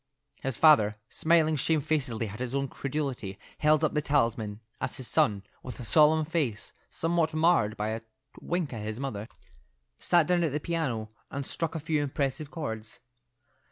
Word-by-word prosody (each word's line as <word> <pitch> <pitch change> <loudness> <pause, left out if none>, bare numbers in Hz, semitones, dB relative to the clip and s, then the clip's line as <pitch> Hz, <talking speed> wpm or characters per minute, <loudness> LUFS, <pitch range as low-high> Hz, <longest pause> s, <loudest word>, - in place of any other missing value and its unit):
His 135 -3 -2
father, 110 -10 +6
smiling 160 -1 +3
shamefacedly 145 -6 0
at 105 - -9
his 125 +1 -3
own 140 -1 -1
credulity, 135 -9 -3 0.2
held 155 +1 +4
up 155 - +2
the 150 - +1
talisman, 115 -7 0 0.2
as - - -1
his 130 - -2
son, 100 -2 +2 0.2
with 125 - -8
a 125 - -6
solemn 155 +3 +5
face, 150 -10 -2 0.2
somewhat 165 -1 0
marred 155 -10 +3
by 105 +1 -1
a 110 +1 -3 0.4
wink 175 -6 -2
at 110 - -5
his 110 +2 -4
mother, 110 -6 -4 0.7
sat 175 -3 +4
down 175 +1 +2
at 155 -5 0
the 150 - 0
piano 135 -10 -2 0.2
and 140 0 -4
struck 165 +3 -3
a - - -1
few 155 0 0
impressive 140 +1 -2
chords. 110 -10 -5
140 Hz, 165 wpm, -28 LUFS, 115-155 Hz, 0.7 s, father